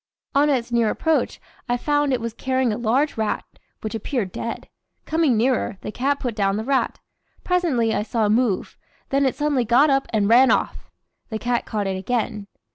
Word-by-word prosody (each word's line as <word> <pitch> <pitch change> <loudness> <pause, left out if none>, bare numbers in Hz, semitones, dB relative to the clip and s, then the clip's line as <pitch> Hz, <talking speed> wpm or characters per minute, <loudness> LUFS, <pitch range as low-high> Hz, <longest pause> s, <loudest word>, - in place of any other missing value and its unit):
On 290 +2 +4
its 245 -4 0
near 235 -2 +2
approach 320 +6 0 0.3
I 245 - +2
found 290 +1 +1
it 255 - +1
was 230 -1 -4
carrying 260 -2 0
a - - -3
large 250 +6 +1
rat, 220 -1 -1 0.4
which 215 - -4
appeared 225 -3 -2
dead. 230 - -5 0.4
Coming 315 -7 +2
nearer, 240 -2 +1
the - - -5
cat 280 +5 0
put 245 -3 -3
down 200 -1 +1
the 220 - -2
rat. 270 +2 0 0.5
Presently 300 -12 +1
I - - 0
saw 220 +1 0
it - - +1
move, 220 -3 0 0.3
then 275 0 +2
it 260 - -1
suddenly 290 -2 +1
got 255 +6 +4
up 270 0 +1
and 210 -3 +2
ran 245 +4 +6
off. - - 0 0.4
The 220 - -3
cat 240 +1 -1
caught 210 -2 -2
it 190 -1 -2
again. 215 -1 -2
240 Hz, 195 wpm, -22 LUFS, 220-275 Hz, 0.5 s, ran